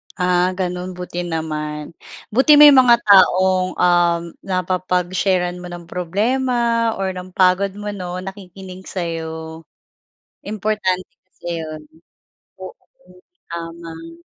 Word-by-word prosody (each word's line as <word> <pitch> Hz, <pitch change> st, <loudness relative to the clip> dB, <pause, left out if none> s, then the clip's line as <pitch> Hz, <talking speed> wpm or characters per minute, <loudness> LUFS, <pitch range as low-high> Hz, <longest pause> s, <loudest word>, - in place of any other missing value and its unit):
Ah, 180 Hz, 0 st, +1 dB
gano'n 180 Hz, 0 st, -3 dB
buti 180 Hz, -1 st, -6 dB
naman. 150 Hz, -2 st, -4 dB, 0.4 s
Buti 265 Hz, +7 st, +5 dB
may 295 Hz, 0 st, +10 dB
mga 255 Hz, -3 st, +7 dB
taong, 185 Hz, -2 st, +4 dB
um, 175 Hz, -1 st, +3 dB, 0.2 s
napapag-share-an 185 Hz, 0 st, -1 dB
mo 180 Hz, -, -8 dB
ng 175 Hz, 0 st, -8 dB
problema 230 Hz, +5 st, 0 dB
or 190 Hz, -1 st, -2 dB
ng 185 Hz, 0 st, -9 dB
pagod 185 Hz, +1 st, +3 dB
mo 205 Hz, 0 st, -5 dB
'no, 180 Hz, -2 st, -6 dB
nakikinig 190 Hz, -1 st, -10 dB
sa'yo. 160 Hz, -2 st, -5 dB, 0.8 s
Importante 205 Hz, -3 st, -1 dB, 0.2 s
kasi 175 Hz, -2 st, -6 dB
'yon, 155 Hz, -1 st, -7 dB, 0.8 s
oo -, -, -6 dB, 0.8 s
tama. 165 Hz, 0 st, -8 dB
180 Hz, 105 wpm, -19 LUFS, 170-195 Hz, 0.8 s, may